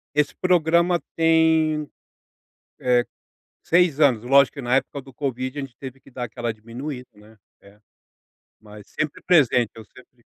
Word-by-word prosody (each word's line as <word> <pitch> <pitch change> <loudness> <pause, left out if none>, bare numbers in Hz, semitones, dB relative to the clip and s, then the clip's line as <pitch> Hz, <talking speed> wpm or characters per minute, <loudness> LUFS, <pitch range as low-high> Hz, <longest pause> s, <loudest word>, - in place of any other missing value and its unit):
Esse 150 -1 +1
programa 170 0 +2 0.2
tem, 160 -2 +2 0.9
eh, 125 -1 +2 0.6
6 170 -4 +2
anos, 130 -7 +3
lógico 140 +3 +4
que 140 - -6
na 125 0 +1
época 135 +1 -1
do 135 0 -15
covid 130 0 -4
a - - -2
gente 135 -4 -9
teve 135 -1 -9
que 135 - -20
dar 125 -1 -5
aquela 120 -1 -4
diminuída, 125 +4 -8
né, 105 +1 -19 0.2
é, 100 +1 -20 0.8
mas 105 -1 -14
sempre 155 -1 -4
presente, 130 - +3
eu 115 - -10
sempre 125 +2 -21
135 Hz, 150 wpm, -23 LUFS, 120-155 Hz, 0.9 s, lógico